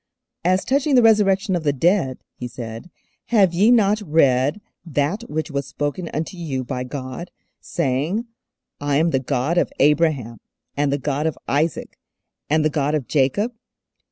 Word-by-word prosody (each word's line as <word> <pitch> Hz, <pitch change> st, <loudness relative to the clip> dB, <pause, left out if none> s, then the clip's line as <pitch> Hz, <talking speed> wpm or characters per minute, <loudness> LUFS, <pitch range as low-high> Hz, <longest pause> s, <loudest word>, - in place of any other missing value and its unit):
'As 185 Hz, +2 st, +2 dB
touching 275 Hz, +1 st, +2 dB
the 245 Hz, -, +6 dB
Resurrection 195 Hz, -4 st, +3 dB
of 170 Hz, -, -2 dB
the 145 Hz, -, +2 dB
dead,' 145 Hz, -2 st, +1 dB, 0.2 s
He 125 Hz, -, -6 dB
said, 115 Hz, +4 st, -8 dB, 0.4 s
'_have 195 Hz, -6 st, +4 dB
ye 200 Hz, +6 st, +4 dB
not 215 Hz, -3 st, +4 dB
read 150 Hz, -2 st, +2 dB, 0.2 s
that 155 Hz, +5 st, -1 dB
which 155 Hz, +1 st, -3 dB
was 140 Hz, -1 st, -3 dB
spoken 145 Hz, +5 st, -3 dB
unto 165 Hz, +5 st, -4 dB
you 140 Hz, -7 st, -3 dB
by 125 Hz, 0 st, -4 dB
God, 130 Hz, +5 st, -6 dB, 0.3 s
saying, 165 Hz, -, -1 dB, 0.5 s
I 145 Hz, -1 st, 0 dB
am 165 Hz, +3 st, +3 dB
the 135 Hz, -, +2 dB
God 135 Hz, +6 st, 0 dB
of -, -, 0 dB
Abraham, 145 Hz, -6 st, +2 dB, 0.4 s
and 145 Hz, 0 st, +1 dB
the 140 Hz, -, +1 dB
God 145 Hz, +2 st, -1 dB
of 160 Hz, -, -3 dB
Isaac, 150 Hz, +2 st, -1 dB, 0.5 s
and 155 Hz, +1 st, +2 dB
the 155 Hz, -, +2 dB
God 145 Hz, 0 st, 0 dB
of 140 Hz, -5 st, -3 dB
Jacob? 160 Hz, -, +1 dB
155 Hz, 160 wpm, -21 LUFS, 135-180 Hz, 0.5 s, the